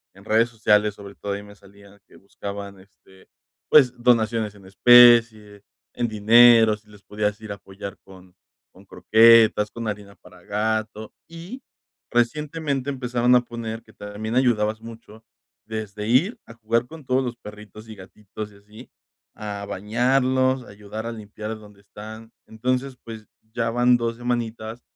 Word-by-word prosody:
en 100 - -17
redes 115 +2 +2
sociales, 105 -2 +1
sobre 100 -1 -11
todo, 100 - -5
ahí 100 +1 -6
me 105 0 -14
salían 100 0 -19
que - - -21
buscaban, 100 0 -9
este, 95 -1 -22 0.4
pues, 130 -5 +6
donaciones 115 -3 +1
en 100 -2 -17
especie, 115 -1 +5 0.3
en 120 -1 -2
dinero, 115 +1 +6
si 105 0 -27
les 105 -1 -18
podías 105 0 -3
ir 110 -1 -8
a - - -4
apoyar 100 0 -10
con 95 -1 -17 0.4
con - - -19
croquetas, 110 -1 +4
con 115 +1 -7
arena 100 -1 -8
para 90 - -19
gato, 110 +1 -3
y 170 +10 -10 0.5
recientemente, 140 +3 -1
empezaron 125 -2 +1
a 125 - +5
poner 115 -1 -7
que 110 - -20
también 105 +3 -6
ayudabas 110 -4 +1
mucho, 115 -1 -13 0.4
desde 105 -1 -6
ir 150 - +2
a 115 - -13
jugar 115 +1 -1
con 160 -3 -13
todos 130 +1 +1
los 120 -1 -4
perritos, 105 0 -13
y 110 - -9
gatitos 105 +2 -10
y - - -19
así, 105 +2 -16 0.4
a 100 -1 -6
bañarlos, 130 +5 0
ayudar 105 +2 -9
a 115 - -4
limpiar 110 0 -8
donde 105 -1 -17
están, 110 +2 -12 0.2
entonces, 130 +3 -3
pues, 110 -2 -10 0.3
ya 115 -1 -1
van 120 +1 +3
2 115 -1 -3
semanitas, 120 -1 -4
110 Hz, 155 wpm, -23 LUFS, 105-120 Hz, 0.5 s, pues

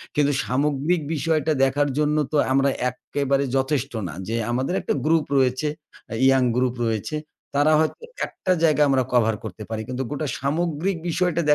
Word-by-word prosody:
কিন্তু 145 -1 +3
সামগ্রিক 145 - +1
বিষয়টা 155 0 +1
দেখার 145 +2 +2
জন্য 150 0 +2
তো 155 - +1
আমরা 135 +1 +3 0.2
এক্কেবারে 140 +2 -1
যথেষ্ট 135 0 0 0.2
না। 80 - -7
যে 115 - -2 0.2
আমাদের 130 +7 -1
একটা - - -1
গ্রুপ 160 -1 +3
রয়েছে, 130 +2 +2 0.4
আ - - -3
ইয়ং 135 -1 +5
গ্রুপ 125 -1 +1
রয়েছে। 110 +6 -2 0.4
তারা 145 +2 +4
হয়তো 160 - 0 0.3
একটা 185 - -3
জায়গায় 150 -2 +4
আমরা 135 -1 +3
কভার 110 -3 +3
করতে 110 -1 -7
পারি। 110 -1 -3
কিন্তু 130 +1 -3
গোটা 145 +1 -2
সামগ্রিক 165 +5 -1
বিষয়টা 170 0 +1
140 Hz, 160 wpm, -23 LUFS, 130-155 Hz, 0.4 s, ইয়ং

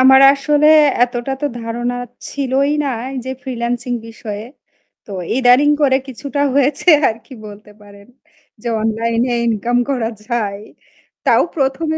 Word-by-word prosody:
আমার 265 +1 +7
আসলে 295 +2 +1 0.4
এতটা 245 +2 -1
তো 290 - 0
ধারণা 240 +2 -3 0.4
ছিলই 275 +1 0
না - - -1 0.3
এইযে 260 0 -5
ফ্রিল্যান্সিং 245 -1 -3 0.2
বিষয়ে। 215 -2 -7 0.6
তো 205 - -9 0.2
ইদানিং 260 +3 +5
করে 265 -2 +4
কিছুটা 280 +3 -5
হয়েছে 280 +4 +1 0.2
আর 220 - -3
কি 265 - -12
বলতে 210 0 -12
পারেন। 200 +1 -16 0.5
যে 240 - -3
অনলাইন-এ 230 +2 0 0.2
ইনকাম 230 +2 0
করা 240 -4 -1 0.2
যায়। 210 -5 -2 0.7
তাও - - +5
১ম 270 +3 0
245 Hz, 130 wpm, -17 LUFS, 230-270 Hz, 0.7 s, আমার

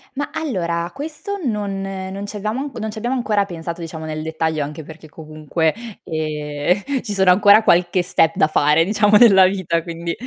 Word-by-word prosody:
Ma 285 +1 -3
allora, 175 - -2
questo 315 +8 -6
non 210 - -2
non 195 0 -5
ci 205 +1 -8
abbiamo 215 +5 -3
anc 280 0 -6
non 220 0 -4
ci 220 - -11
abbiamo 240 +4 -2
ancora 210 -5 0
pensato 170 -2 -7
diciamo 165 -1 -7
nel 155 0 -5
dettaglio, 160 -1 -2
anche 150 +2 -5
perché 160 +1 -13
comunque, 155 +1 -2 0.3
ehm, 155 - -2
ci 210 - -5
sono 190 -2 +4
ancora 205 +3 +6
qualche 180 -1 +3
step 165 -2 +1
da 155 - +3
fare, 150 +1 +3
diciamo 210 +2 +2
nella 200 -4 +7
vita 185 -3 -1
quindi 170 0 -5
185 Hz, 180 wpm, -19 LUFS, 160-210 Hz, 0.3 s, nella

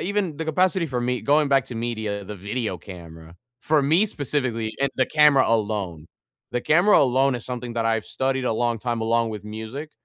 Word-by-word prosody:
even 190 -6 -1
the 160 - -4
capacity 180 +2 +1
for 125 -4 -3
me 125 +1 -1
going 145 +1 +2
back 135 -1 +3
to 120 - -8
media, 110 -3 -3
the 105 - -7
video 105 0 -4
camera, 85 -2 -12 0.2
for 155 -2 +2
me 165 +10 +3
specifically, 130 - -2
and 140 - +1
the 130 - +2
camera 150 -3 +5
alone. 100 -8 -1 0.5
The 125 - 0
camera 175 +10 +4
alone 135 0 +3
is 120 - -5
something 125 -1 -5
that 115 -1 0
I've 115 -1 0
studied 130 0 -2
a 120 - +1
long 120 0 0
time 120 0 -2
along 115 0 +1
with 105 -2 -6
music. 110 +8 -7
120 Hz, 195 wpm, -23 LUFS, 110-145 Hz, 0.5 s, camera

